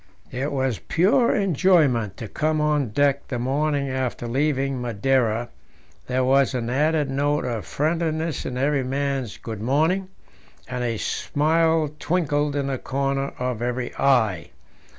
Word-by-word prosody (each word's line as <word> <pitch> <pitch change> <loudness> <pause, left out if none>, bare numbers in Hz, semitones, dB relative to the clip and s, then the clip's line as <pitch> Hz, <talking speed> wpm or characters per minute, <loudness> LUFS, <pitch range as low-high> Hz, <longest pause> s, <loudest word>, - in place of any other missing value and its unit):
It 135 +4 -2
was 130 -5 -1
pure 210 +8 +2
enjoyment 160 - +2
to 115 - -6
come 155 +6 0
on 150 -4 +1
deck 140 +5 +1
the 125 - -3
morning 140 +3 0
after 130 -2 -3
leaving 135 0 0
Madeira; 120 0 0 0.6
there 130 +1 +1
was 135 +1 +3
an 120 -1 -2
added 150 +2 +2
note 145 +2 0
of 115 -4 -3
friendliness 160 0 -1
in 125 - -4
every 140 +1 +1
man's 135 -3 -2
"Good 110 -3 -7
morning," 160 - +1 0.6
and 125 -1 -3
a 115 -2 -1
smile 160 +4 +1
twinkled 150 -4 0
in 140 -1 0
the 135 -2 -2
corner 135 0 -2
of 125 -2 -3
every 125 +1 -2
eye. 110 -10 +2
135 Hz, 140 wpm, -23 LUFS, 125-150 Hz, 0.6 s, was